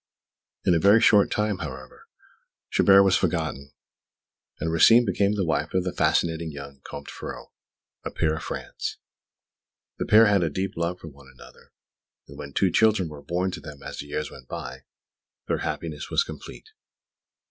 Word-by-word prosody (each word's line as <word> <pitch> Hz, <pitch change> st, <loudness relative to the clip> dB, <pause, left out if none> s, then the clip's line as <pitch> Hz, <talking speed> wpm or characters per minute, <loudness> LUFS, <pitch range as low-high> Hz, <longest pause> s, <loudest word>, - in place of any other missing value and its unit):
In 90 Hz, -, +4 dB
a 85 Hz, -, +3 dB
very 100 Hz, +6 st, +6 dB
short 105 Hz, -3 st, +5 dB
time, 105 Hz, -2 st, -1 dB
however, 65 Hz, -4 st, -9 dB, 0.6 s
Chabert 100 Hz, 0 st, +6 dB
was 95 Hz, -1 st, +3 dB
forgotten, 80 Hz, -6 st, -2 dB, 0.9 s
and 80 Hz, +1 st, -2 dB
Rosine 115 Hz, +9 st, +6 dB
became 100 Hz, +1 st, +1 dB
the 100 Hz, -3 st, 0 dB
wife 80 Hz, +1 st, -1 dB
of 95 Hz, -, +2 dB
the 90 Hz, -, -3 dB
fascinating 80 Hz, -1 st, +1 dB
young 70 Hz, -1 st, -10 dB
Comte 70 Hz, 0 st, -9 dB
Ferraud, -, -, -8 dB, 0.5 s
a -, -, -4 dB
peer 80 Hz, -1 st, 0 dB
of 80 Hz, -, -6 dB
France. -, -, -5 dB, 1.0 s
The -, -, -2 dB
pair 110 Hz, +1 st, +7 dB
had 100 Hz, -3 st, +3 dB
a 85 Hz, -, +1 dB
deep 95 Hz, +6 st, -3 dB
love 85 Hz, +1 st, -2 dB
for -, -, -10 dB
one 70 Hz, -1 st, -17 dB
another; -, -, -17 dB, 0.6 s
and 70 Hz, -, -12 dB
when 70 Hz, 0 st, -8 dB
two 95 Hz, +6 st, +1 dB
children 110 Hz, -5 st, +3 dB
were 75 Hz, -2 st, -10 dB
born 90 Hz, +4 st, -2 dB
to -, -, -7 dB
them 75 Hz, -3 st, -11 dB
as 70 Hz, +1 st, -7 dB
the 75 Hz, -, -6 dB
years 75 Hz, +1 st, -4 dB
went 65 Hz, -, -13 dB
by, 65 Hz, +1 st, -7 dB, 0.6 s
their -, -, 0 dB
happiness 80 Hz, -3 st, -5 dB
was -, -, +2 dB
complete. 440 Hz, -, -11 dB
85 Hz, 170 wpm, -25 LUFS, 70-95 Hz, 1.0 s, pair